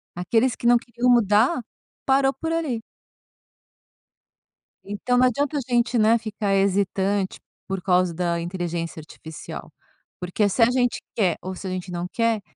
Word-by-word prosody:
Aqueles 225 +8 +1
que - - -9
não 240 0 +6
queriam 240 +1 -3
mudar 235 - +4 0.4
parou 270 0 +3
por 325 +3 -4
ali. 305 -9 -1 2.0
Então 205 +5 -1
não 255 +1 +5
adianta 285 +4 -1
a 280 - 0
gente, 240 0 +1
né, 220 +1 +5
ficar 215 -3 -2
hesitante 195 0 0 0.3
por 195 -1 -3
causa 180 -1 +2
da 170 0 -1
inteligência 170 -2 -4
artificial, 160 0 -10 0.5
porque, 180 +4 0
se 230 - -1
a 230 - +7
gente 245 -1 +1 0.2
quer, 185 -7 +1
ou 185 0 -5
se 190 - -9
a - - -3
gente 185 0 -5
não 175 0 -3
quer, 230 -2 +1
210 Hz, 155 wpm, -23 LUFS, 185-245 Hz, 2.0 s, a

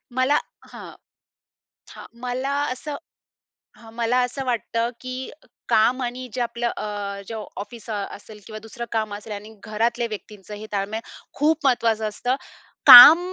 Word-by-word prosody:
मला 260 +3 +2 0.4
हं, - - -10 1.0
हां. - - -11 0.2
मला 255 +2 -3 0.2
असं 290 +3 -6 0.8
हं. 225 - -15
मला 235 +1 0
असं 265 +2 -5
वाटतं, 235 -1 -2
की 255 0 -6 0.4
काम 240 +4 +2
आणि 250 +1 -5
जे 255 - -3
आपलं 235 0 -2
अ, 200 -1 -5
जे 225 - -6 0.3
ऑफिस 235 +1 -13
अ, - - -2 0.2
असेल 210 +1 -15
किंवा 215 -1 -8
दुसरं 235 +1 -7
काम 215 -2 -2
असेल 210 +1 -9
आणि 210 +2 -9
घरातल्या 230 +2 -1
व्यक्तींचं 210 -1 -9
हे 210 +1 -9
ताळमेळ, 205 +2 -3 0.3
खूप 305 +1 0
महत्वाचं 225 -4 +1
असतं. 245 +5 -2 0.5
काम 270 +7 +12
235 Hz, 145 wpm, -22 LUFS, 215-255 Hz, 1.0 s, काम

